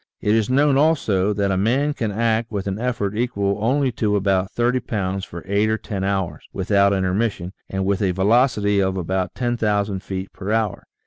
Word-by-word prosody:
It 105 - +1
is 110 0 +2
known 140 +1 +3
also, 110 - +2
that 100 -1 0
a 95 - +1
man 130 +9 +1
can 115 -7 -2
act 115 +1 0
with 100 -3 -3
an 100 +1 -3
effort 115 -5 -2
equal 100 -4 -1
only 135 +3 +2
to 105 -3 0
about 95 -1 +1
30 120 +3 +1
pounds 95 -4 -3
for 85 -1 -9
eight 100 +2 +2
or 110 - +1
ten 100 -3 -5
hours, 95 -3 -2
without 100 +1 +2
intermission, 95 0 -1 0.2
and 95 0 -2
with 100 0 0
a 100 - +2
velocity 105 +1 +2
of 95 0 0
about 95 +1 -2
10,000 105 -5 0
feet 95 0 -6
per 100 +2 -5
hour. 110 -3 -1
100 Hz, 190 wpm, -21 LUFS, 95-115 Hz, 0.2 s, known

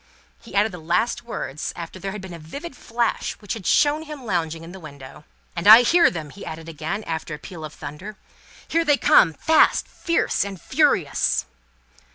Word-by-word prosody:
He 230 - -12
added 210 +2 +3
the 180 - -8
last 170 +9 0
words, 155 - -5
after 170 +2 -8
there 195 +1 -4
had 210 0 -7
been 190 -2 -9
a 170 - -9
vivid 275 - -8
flash 235 -1 -2
which 205 - -6
had 210 -6 -6
shown 300 +1 +3
him 300 -4 -9
lounging 165 -5 -2
in 165 - -10
the 190 - -10
window. 140 -5 -12 0.3
"And - - -2
I 225 +3 +11
hear 340 +7 +5
them!" 155 -4 -7
he 200 - -11
added 160 +1 -8
again, 165 +6 -4
after 160 -3 -4
a - - -10
peal 160 +1 -10
of 155 - -6
thunder. 190 +9 -8 0.5
"Here 335 0 +1
they 295 -3 +3
come, 165 -10 +5
fast, 320 - +3
fierce, 335 - 0
and 195 -2 -7
furious!" - - +1
190 Hz, 195 wpm, -23 LUFS, 160-235 Hz, 0.5 s, I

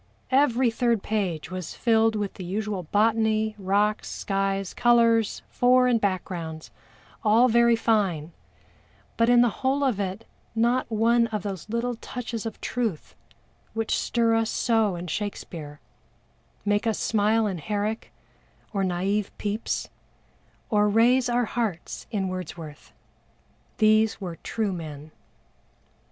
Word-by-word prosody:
Every 260 -3 +3
third 230 -2 +1
page 185 -7 -2
was 185 -3 -5
filled 225 -1 +3
with 205 -2 -2
the 185 - -8
usual 200 +1 -3
botany, 220 +3 +1
rocks, 205 +2 +1
skies, 195 -1 -2
colors, 230 -2 +3
fore 250 +1 +4
and 235 -3 +2
backgrounds 175 -5 -3 0.5
"all 225 +3 +5
very 235 0 +4
fine" 195 -9 0 0.8
but 230 0 +2
in 245 0 +6
the 240 - +4
whole 275 +2 +1
of 250 -7 +1
it 195 +2 -3 0.3
not 240 +3 +1
one 230 +2 +3
of 215 -2 -4
those 195 -2 -6
little 235 +2 -1
touches 235 -2 -5
of 225 - -8
truth 225 -10 -3 0.6
which 225 0 0
stir 230 -1 +1
us 225 0 +1
so 225 -5 +1
in 175 +1 -6
SHAKESPEARE, 165 -5 -5 0.9
make 205 +2 +1
us 220 - +1
smile 220 +1 +2
in 190 -4 -2
HERRICK 210 +6 -3 0.6
or 195 -2 0
naïve 190 +3 0
PEPYS, 210 +2 -2 0.8
or 210 -1 +3
raise 240 +4 +4
our 240 0 +2
hearts 215 -7 -4
in 195 -3 -1
WORDSWORTH. 165 -5 -7 0.9
These 215 0 +3
were 175 -4 -6
true 215 -4 -2
men. 155 -3 -8
215 Hz, 130 wpm, -25 LUFS, 190-230 Hz, 0.9 s, in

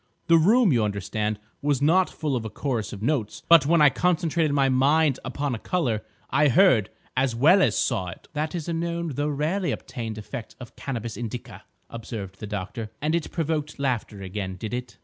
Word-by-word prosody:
The 165 0 +5
room, 210 - +5
you 115 -3 +2
understand, 105 +1 -2 0.2
was 145 -2 +1
not 170 +6 +3
full 150 -4 -2
of 120 - -2
a 110 - -5
chorus 115 -2 -3
of 105 0 -8
notes; 120 -6 -1
but 165 -4 +7
when 165 -1 +5
I 145 - +7
concentrated 165 +1 +1
my 140 -1 +3
mind 140 +2 +3
upon 140 -2 -2
a 115 - -4
colour, 125 -12 -1 0.3
I 150 +2 +4
heard, 140 - +4 0.3
as 130 -2 +1
well 160 +11 +5
as 115 - +2
saw, 90 - 0
it." 90 - -10
"That 155 +2 -2
is 165 -2 -4
a 170 - -1
known, 170 0 -2
though 145 +1 -2
rarely 160 +6 -1
obtained, 115 -4 -5
effect 110 +2 -7
of 125 -3 -11
Cannabis 120 -4 -5
indica," 120 0 -7 0.2
observed 105 -4 -7
the 105 - -6
doctor. 105 +2 -5
"And 155 +2 0
it 170 -2 -1
provoked 155 -2 -2
laughter 120 -7 -2
again, 95 0 -4
did 110 +5 -6
it?" 125 -1 -5
135 Hz, 195 wpm, -25 LUFS, 110-160 Hz, 0.3 s, but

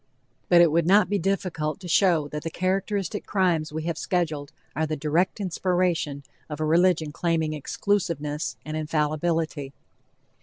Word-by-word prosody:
But 175 -1 +7
it 170 -3 +5
would 165 +1 +2
not 200 +1 +5
be 205 0 +1
difficult 170 -4 -1
to 180 - -7
show 170 -3 +3
that 150 +1 -5
the 165 - -4
characteristic 195 +3 -1
crimes 175 -6 +1
we 155 +1 -4
have 165 -1 -3
scheduled 155 -5 -1 0.2
are 160 +1 0
the 155 - -2
direct 160 +8 0
inspiration 175 -6 0 0.3
of 150 -1 -5
a 155 - 0
religion 165 -1 +3
claiming 160 -1 0
exclusiveness 155 -2 -2
and 155 +1 -4
infallibility. 155 -1 -1
165 Hz, 150 wpm, -25 LUFS, 155-185 Hz, 0.3 s, But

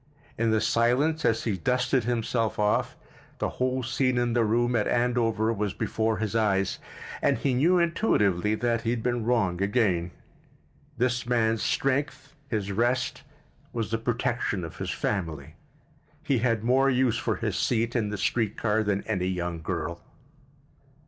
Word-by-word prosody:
In 115 0 +1
the 110 0 +3
silence, 125 +9 +2
as 115 -1 +2
he 105 -5 -1
dusted 125 - +1
himself 115 -1 -1
off, 105 0 +1 0.4
the - - -1
whole 130 0 +1
scene 130 +1 0
in 120 -1 +1
the 120 -1 +3
room 120 +3 +1
at 105 - +1
Andover 115 -2 +1
was 105 -2 -2
before 110 -1 -1
his 110 -1 -3
eyes— 100 -4 +1 0.4
and - - +2
he 135 - 0
knew 165 +9 +3
intuitively 105 - +2
that 115 0 0
he 115 - -2
had 115 -1 -1
been 120 -2 0
wrong 105 -7 +1
again. 100 -5 +1 0.9
This 125 0 0
man's 115 -2 +1
strength, 140 +1 -1 0.2
his 100 -3 -2
rest, 120 +4 0 0.5
was 115 -2 -3
the 115 - 0
protection 120 -4 -1
of 80 - -8
his - - -4
family. 80 -7 -3 0.7
He 135 -4 +1
had 115 -2 +1
more 130 +3 +3
use 130 -2 +2
for - - -1
his - - -2
seat 115 0 0
in 110 -4 0
the 105 - -3
street 110 0 0
car 110 -1 +1
than 100 -2 -1
any 90 -5 -1
young 90 -2 -3
girl. 85 +2 -4
115 Hz, 160 wpm, -27 LUFS, 105-125 Hz, 0.9 s, the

